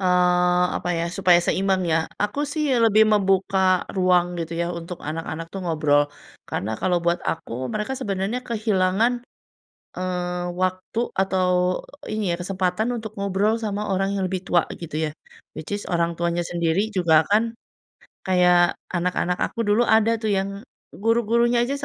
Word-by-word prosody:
Eee, 180 -1 +3
apa - - -4
ya, 165 -1 -1
supaya 180 -1 +4
seimbang 190 +1 +1
ya. 160 0 +2 0.2
Aku 280 +8 0
sih 300 +1 -1 0.2
lebih 220 0 +5
membuka 190 -2 +2
ruang 180 -1 +2
gitu 165 -1 -4
yah 170 - 0
untuk 170 0 -6
anak-anak 160 +1 -5
tuh 190 +1 -7
ngobrol. 150 -3 +2 0.4
Karena 110 +2 -3
kalau 180 +5 0
buat 170 0 +1
aku, 130 -5 -3
mereka 215 +5 -2
sebenarnya 215 +1 -2
kehilangan, 220 +1 +1 0.7
eee, 180 -1 -2
waktu 185 +4 -2 0.2
atau 185 -1 +1 0.2
iya 205 -6 -2
kesempatan 190 +5 -1
untuk 220 -2 -7
ngobrol 200 +3 +1
sama 210 -2 -3
orang 195 +1 0
yang 195 - -1
lebih 185 -1 -4
tua 175 -1 +3 0.2
gitu 165 -3 -6
yah. - - -14 0.4
Which 160 +6 -5
is 205 - -4
orang 170 -1 0
tuanya 170 0 -1
sendiri 175 +6 -1
juga 160 -4 +4
akan 225 +3 +1 0.7
kayak 180 -1 +4 0.2
anak-anak 180 0 -1
aku 230 - -1
dulu 215 +3 +2
ada 220 +1 +3
tuh 220 - -2
yang 200 0 -1 0.3
guru-gurunya 235 +2 +2
aja 270 +3 -2
185 Hz, 150 wpm, -23 LUFS, 175-210 Hz, 0.7 s, lebih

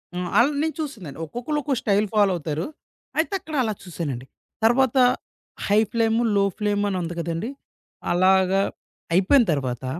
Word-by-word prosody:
హ్మ్. 180 -1 -3
అళ్ళ 245 +5 +6
నేను 315 0 -1
చూసిందండి. 195 - -7
ఒక్కొక్కళ్ళు 245 - -3
ఒక్క 280 -1 0
స్టైల్ 205 0 +2
ఫాలో 205 -2 +4
అవుతారు. 155 0 -3 0.5
అయితే 330 +5 0
అక్కడ 315 -3 -7
అలా 220 -2 -1
చూసానండి. 150 -8 -5 0.4
తర్వాత 260 +2 +3 0.7
హై 205 +1 +4
ఫ్లేము, 225 0 +2
లో 200 - +4
ఫ్లేమ్ 205 -1 0
అని 190 - -1
ఉంది 170 0 -4
కదండీ! 170 +7 -3 0.6
అలాగా. 190 +1 +4 0.5
అయిపోయిన 195 +9 +5
తర్వాత 130 -3 -3
200 Hz, 145 wpm, -24 LUFS, 170-235 Hz, 0.7 s, అళ్ళ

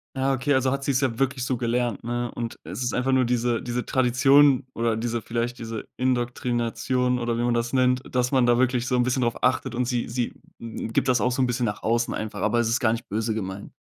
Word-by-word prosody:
Ja, 135 +1 +1
okay, 135 +2 0
also, 130 0 +2
hat 140 0 -3
sie's 135 -2 +1
ja 130 -4 -1
wirklich 130 -2 0
so 130 - 0
gelernt, 120 -2 -1
ne? 120 +1 -2
Und 115 -1 -5
es 125 - -5
ist 120 - -1
einfach 130 +2 +1
nur 130 -1 +4
diese 120 -1 0
diese 120 0 -3
Tradition 135 +2 +4
oder 115 -1 0
diese 115 0 -2
vielleicht 120 +2 -3
diese 115 -1 -6
Indoktrination, 125 0 0
oder 120 -1 -1
wie 120 - 0
man 120 - +1
das 120 0 -1
nennt, 125 -1 +2
dass 125 0 +1
man 130 -2 +4
da 120 0 +4
wirklich 125 -1 +1
so 125 - +1
'n 125 - +3
bisschen 130 +1 0
drauf 120 -1 -1
achtet. 125 0 +1
Und 125 +1 0
sie 120 -1 -2
sie 120 0 -2 0.3
gibt 115 +2 -2
das 125 -4 +3
auch 125 - +2
so 125 - 0
'n 130 - +3
bisschen 125 0 -1
nach 105 -1 -3
außen 120 +1 0
einfach, 110 0 -5
aber 110 +3 +2
es 120 - +2
ist 115 +4 0
gar 115 -3 +3
nicht 115 0 -4
böse 110 +2 -1
gemeint. 95 -2 -5
120 Hz, 245 wpm, -25 LUFS, 115-130 Hz, 0.3 s, nur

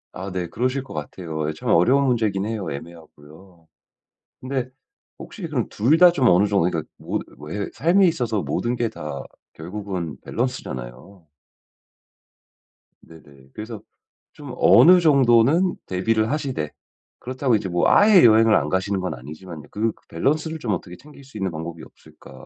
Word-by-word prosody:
아 95 +2 -7
네 90 -1 -3
그러실 130 +7 -2
것 135 - -12
같아요. 80 +1 -5
이게 80 - -2
참 - - -5
어려운 130 +11 +4
문제긴 110 -6 0
해요 105 -5 -4
애매하고요. 80 +2 -13 0.8
근데 130 -1 -3 0.5
혹시 210 - -11
그럼 130 -7 -1
2 125 +9 +2
다 180 0 +7
좀 130 -7 +2
어느 90 +3 +4
정도 100 -4 +1
그러니까 80 -3 -2 0.2
모드 - - -4 0.2
왜 100 +7 -4
삶에 185 +4 +3
있어서 120 - -1
모든 120 +1 -2
게 120 -1 0
다 75 -7 -7 0.3
결국은 90 -3 -6
밸런스잖아요. 80 - -6 1.8
네네. 70 -5 -18
그래서 110 0 -8 0.5
좀 145 -4 -10
어느 180 +2 +7
정도는 140 +3 +4
대비를 110 +5 0
하시되 135 - -3 0.5
그렇다고 130 -1 -1
이제 105 -3 -2
뭐 85 0 +1
아예 205 -3 +6
여행을 110 -1 +6
안 75 0 +1
가시는 95 +3 -1
건 90 0 -3
아니지만요, 75 +5 -10
'그 110 +2 -1 0.2
밸런스를 155 - -1
좀 115 -7 -2
어떻게 90 0 -6
챙길 145 +1 -16
수 135 -4 -12
있는 95 -3 -2
방법이 80 0 -7
없을까.' 65 0 -16
105 Hz, 325 characters per minute, -22 LUFS, 85-130 Hz, 1.8 s, 다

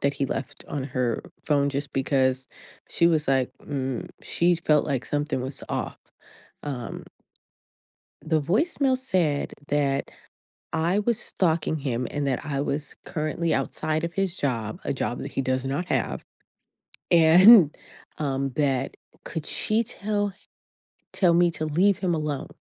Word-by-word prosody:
that 140 0 +1
he 135 - -1
left 135 0 -5
on 140 -3 -3
her 125 -4 -1 0.2
phone 140 -2 +2
just 140 +1 -4
because 130 -1 +1 0.4
she 170 - +3
was 155 -4 +2
like, 130 -2 +2
"mm" 135 -3 -3
she 175 0 +2
felt 150 -3 +2
like 135 -3 -1
something 145 -2 -1
was 130 +2 -6
off, - - -3 0.6
um 130 -5 -5 1.2
The 155 -1 +1
voicemail 260 - +1
said 180 - 0
that 140 -1 0 0.6
I 165 +4 +1
was 225 +1 +1
stalking 160 -3 0
him 125 -3 -2
and 145 -1 -2
that 130 -3 -1
I 140 -2 -2
was 145 0 -3
currently 160 0 -1
outside 155 +1 -1
of 170 - -4
his 195 -2 0
job- 115 -8 -2
a - - 0
job 120 -2 -2
that 140 - -6
he 135 - -1
does 130 0 -1
not 140 +7 -2
have - - -1 0.9
and, 170 +1 +8 0.4
um, 135 -2 -1
that 135 -3 0 0.3
could 160 -3 -5
she 220 +2 0
tell 205 -3 -2
h 210 - -31 0.6
tell 180 -4 +3
me 175 +1 +5
to 155 -1 -4
leave 180 +6 +3
him 180 -3 0
alone? 150 -3 -3
150 Hz, 150 wpm, -25 LUFS, 135-170 Hz, 1.2 s, and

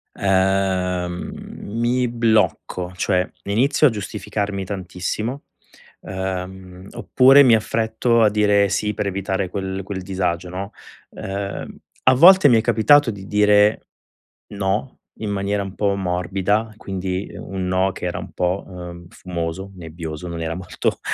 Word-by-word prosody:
Ehm, 95 -2 0 0.3
mi 120 +4 0
blocco 110 -6 0
cioè 90 +1 +1 0.2
inizio 130 +9 +3
a - - +4
giustificarmi 105 -2 -4
tantissimo, 95 +7 -4 0.6
uhm, 95 0 -6
oppure 135 +2 +5
mi 120 -4 +6
affretto 110 +2 +1
a 110 - +5
dire 105 -1 +3
sì 105 +2 -1
per 100 - -2
evitare 95 -1 -2
quel 95 0 -4
quel 95 -1 -6
disagio, 90 -2 -2
no, 95 +3 -6 0.4
uhm, 100 0 -6 0.3
a 130 - +6
volte 175 +4 +8
mi 120 - +5
è 110 - +3
capitato 120 +4 +4
di 100 -3 -6
dire: 105 +1 +3 0.6
"No." 100 +5 -2 0.3
In 110 -2 -3
maniera 100 0 -1
un 95 0 -8
po' 100 -1 +1
morbida, 95 +4 -1
quindi, 95 -1 -4
uhm, - - -9
un 95 -1 -2
no 95 0 +1
che - - -11
era - - -3
un - - -9
po', 90 +2 -1
uhm, 90 -2 -9
fumoso, 90 +2 -5
nebbioso, 80 0 -7
non 85 -1 -5
era 80 +1 -3
molto 90 0 -3
95 Hz, 140 wpm, -21 LUFS, 90-105 Hz, 0.6 s, volte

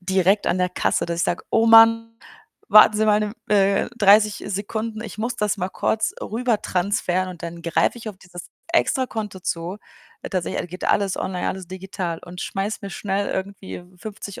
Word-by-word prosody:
direkt 190 +2 +2
an 185 - +1
der 180 - +1
Kasse, 180 - 0
dass 170 0 -3
ich - - +2
sage: 175 - -2
„Oh 225 0 +3
Mann, 230 0 +6 0.5
warten 215 0 +7
Sie 215 0 +2
mal 210 0 +4
'ne 210 -1 -2 0.2
M 210 - +2
äh, 200 0 +3
30 210 0 +4
Sekunden, 215 +3 -4
ich 220 - -9
muss 235 +3 -2
das 210 0 0
mal 180 0 -2
kurz 220 +3 -1
rüber 230 0 -1
transferieren.“, 185 0 -1
und 180 -2 -10
dann 170 0 -7
greife 170 +7 +1
ich 225 - -7
auf 200 - -8
dieses 175 -2 -11 0.2
Extrakonto 225 - 0
zu. 170 +3 -3 0.5
Tatsächlich, 185 -3 -2
all - - -5
geht 180 +2 -7
alles 200 -2 +1
online, 180 -1 -2
alles 190 -2 -5
digital 185 -2 -5
und 180 0 -9
schmeiße 195 +3 -3
mir 200 - -6
schnell 200 0 -2
irgendwie 195 0 -5
w 180 +1 -22
50 205 -1 -8
200 Hz, 190 wpm, -22 LUFS, 185-215 Hz, 0.5 s, warten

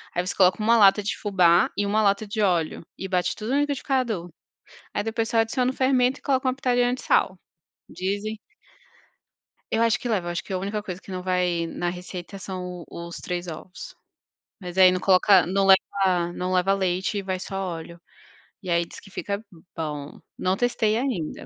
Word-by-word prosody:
aí 175 +1 0
você 185 - -3
coloca 185 +2 +4
1 230 +1 +5
lata 205 0 +6
de 205 - -2
fubá 180 -4 +4
e 205 - +1
1 215 +2 +2
lata 200 +1 +2
de 215 +1 -2
óleo 175 -5 +1 0.2
e 190 - -5
bate 180 -1 0
tudo 220 +4 -5
no 285 - +3
liquidificador, 255 - -1 0.7
aí 205 - 0
depois 225 0 -2
só 230 - -2
adiciona 250 +3 +1
o - - -6
fermento 260 0 +2
e - - -40
coloca 265 -2 0
uma 255 - +1
pitadinha 245 -2 +1
de - - -9
sal, 185 - +2 0.5
dizem 205 +4 -3 1.3
Eu 225 - +1
acho 230 0 +3
que 245 - -5
leva, 180 -6 -1
acho 175 - -3
que 195 - -8
a 185 - 0
única 205 +2 -3
coisa 185 -2 -6
que - - -13
não 185 -1 -4
vai 180 -2 0
na 175 +1 -3
receita 180 +2 -7
são 180 -2 -6
os 170 0 -7
3 175 0 -4
ovos, 175 +4 -9 0.7
mas 180 0 -7
aí 185 -1 +8
não 185 - -1
coloca, 190 -1 +5
não 195 +2 +1
leva 190 -2 +3
não 180 +1 -3
leva 185 +1 +3
leite 190 +1 0
e - - -3
vai 185 -1 -3
só 195 +1 -6
óleo 170 -2 -5 0.6
e 185 - -6
aí 170 0 +2
diz - - -12
que 195 - -16
fica 200 +1 -3
b 215 - -14 0.3
bom, 150 -3 -5 0.2
não 185 +1 +1
testei 225 -3 +1
ainda. 235 - -3
195 Hz, 200 wpm, -25 LUFS, 180-220 Hz, 1.3 s, aí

